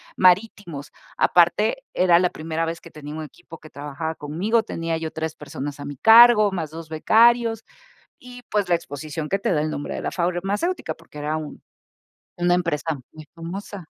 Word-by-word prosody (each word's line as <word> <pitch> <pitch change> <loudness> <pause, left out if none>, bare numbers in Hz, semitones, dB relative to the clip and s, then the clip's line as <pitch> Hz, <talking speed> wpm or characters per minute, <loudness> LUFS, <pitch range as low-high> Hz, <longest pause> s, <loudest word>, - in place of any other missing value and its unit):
marítimos. 185 -5 +1 0.3
Aparte, - - +3
era 175 -2 +4
la 180 0 +2
primera 165 -1 -3
vez 165 +1 -5
que 170 - -14
tenía 150 0 -9
un 155 - -5
equipo 165 +2 -12
que 155 - -14
trabajaba 145 +3 -5
conmigo, 185 +11 0
tenía 165 -4 -3
yo 160 -1 -4
3 160 -1 -4
personas 145 0 -7
a - - -7
mi 145 -2 -7
cargo, 225 - +7
más 165 -5 -3
2 160 +1 -9
becarios, 225 +7 +3 0.6
y, 250 0 -12
pues, 205 -3 0
la 175 - +4
exposición 155 0 -5
que 195 - 0
te 195 - -1
da 150 - +1
el 155 - -2
nombre 145 - -5
de - - -5
la - - -2
farmacéutica, 195 - -2
porque 165 -2 -15
era 150 +1 -2
un 155 -2 -7 0.8
una 175 0 +2
empresa 165 -4 -1
muy 155 -1 -11
famosa. 180 +2 -7
165 Hz, 180 wpm, -23 LUFS, 155-200 Hz, 0.8 s, cargo